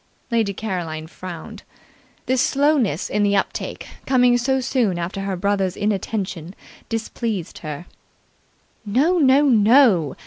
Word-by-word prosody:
Lady 225 -3 +1
Caroline 175 -7 -4
frowned. 185 +5 -9 0.6
This 255 0 +1
slowness 275 - +1
in 210 - -1
the 205 0 +2
uptake, 195 - -3 0.2
coming 250 -2 +4
so 265 +2 +1
soon 245 -8 0
after 175 +3 -4
her 195 -1 -2
brother's 195 -1 0
inattention, 195 -4 -3 0.3
displeased 225 -4 -4
her. 155 +1 -7 1.0
"No, 275 - +2
no, 275 -1 +5
no. 225 - +4
210 Hz, 115 wpm, -21 LUFS, 185-250 Hz, 1.0 s, no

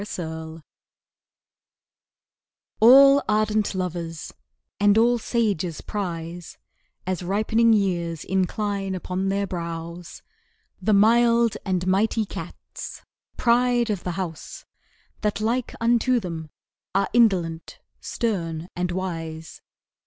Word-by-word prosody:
Cats 160 -4 -6 2.2
All 275 +5 +8
ardent 215 -1 +1
lovers 170 -3 -4 0.5
and 205 +1 +4
all 240 +1 +4
sages 200 -9 -1
prize, 175 -4 -5 0.5
As 185 0 -2
ripening 215 +5 +2
years 175 -6 0
incline 195 +1 -1
upon 185 +1 -3
their 200 +1 0
brows 170 -1 -6 0.6
The 215 - +2
mild 230 +2 +4
and 185 -2 -1
mighty 215 +4 +1
cats - - -9 0.3
pride 240 -1 +2
of 200 -4 -3
the 180 - -3
house 170 -5 -6 0.6
That 210 -1 -1
like 230 +3 -1
unto 240 +2 +2
them 165 -6 -6 0.5
are 195 - +2
indolent, 180 -9 +1 0.2
stern 175 -7 -3
and 180 0 -2
wise. 165 -3 -5
195 Hz, 100 wpm, -24 LUFS, 170-220 Hz, 2.2 s, All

